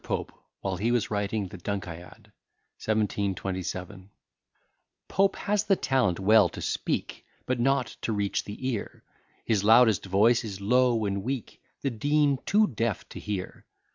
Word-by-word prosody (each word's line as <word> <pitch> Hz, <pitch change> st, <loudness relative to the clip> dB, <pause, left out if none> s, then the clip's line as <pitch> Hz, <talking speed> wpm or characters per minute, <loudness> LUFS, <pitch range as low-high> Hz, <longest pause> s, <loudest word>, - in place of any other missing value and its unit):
POPE, -, -, -3 dB, 0.3 s
WHILE 95 Hz, -2 st, -2 dB
HE 110 Hz, +6 st, 0 dB
WAS 115 Hz, -3 st, 0 dB
WRITING 100 Hz, 0 st, -1 dB
THE 95 Hz, -, -10 dB
"DUNCIAD" 90 Hz, -3 st, -6 dB, 0.5 s
1727 95 Hz, -2 st, -2 dB, 1.0 s
POPE 195 Hz, 0 st, +2 dB
has 210 Hz, 0 st, 0 dB
the 195 Hz, -, +4 dB
talent 130 Hz, -, +1 dB
well 105 Hz, -1 st, +5 dB
to -, -, -9 dB
speak, -, -, -3 dB, 0.2 s
But 130 Hz, -1 st, -1 dB
not 135 Hz, +1 st, +2 dB, 0.2 s
to -, -, -2 dB
reach 100 Hz, -2 st, -1 dB
the 105 Hz, +5 st, -6 dB
ear; 115 Hz, -6 st, -4 dB, 0.4 s
His 105 Hz, -3 st, +1 dB
loudest 110 Hz, -2 st, +5 dB
voice 110 Hz, +6 st, +4 dB
is 100 Hz, -4 st, -6 dB
low 120 Hz, +1 st, +2 dB
and 100 Hz, -1 st, -1 dB
weak, 125 Hz, +1 st, -5 dB, 0.2 s
The 135 Hz, -, 0 dB
Dean 145 Hz, +3 st, +2 dB
too 215 Hz, +1 st, +5 dB
deaf 115 Hz, -, -2 dB
to -, -, -8 dB
hear. 100 Hz, -3 st, -5 dB
110 Hz, 145 wpm, -27 LUFS, 100-125 Hz, 1.0 s, well